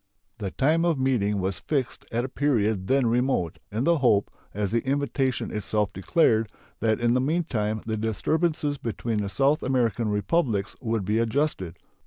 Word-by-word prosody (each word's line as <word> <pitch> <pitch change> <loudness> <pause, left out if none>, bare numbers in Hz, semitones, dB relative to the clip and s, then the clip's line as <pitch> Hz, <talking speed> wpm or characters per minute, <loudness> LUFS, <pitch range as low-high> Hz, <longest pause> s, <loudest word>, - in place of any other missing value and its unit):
The 100 -3 -3
time 155 - +2
of 170 -3 +2
meeting 115 -7 +1
was 95 0 -2
fixed 135 -5 -2
at 120 +2 0
a - - -3
period 110 -9 0
then 135 +1 +3
remote, 120 - 0
in 110 +4 -1
the 170 0 +3
hope, 110 -7 +3 0.2
as 100 -1 -2
the 115 - +1
invitation 135 -4 -1
itself 105 -1 -1
declared, 110 - +2 0.3
that 110 -1 +1
in 120 0 +2
the 125 - +2
meantime 130 -9 -1
the 110 -1 -2
disturbances 145 - 0
between 115 -1 -3
the 100 -1 -2
South 135 +10 +2
American 120 -4 0
Republics 105 - 0
would 115 -4 -1
be 105 +3 +1
adjusted. 115 - -1
115 Hz, 165 wpm, -26 LUFS, 105-135 Hz, 0.3 s, then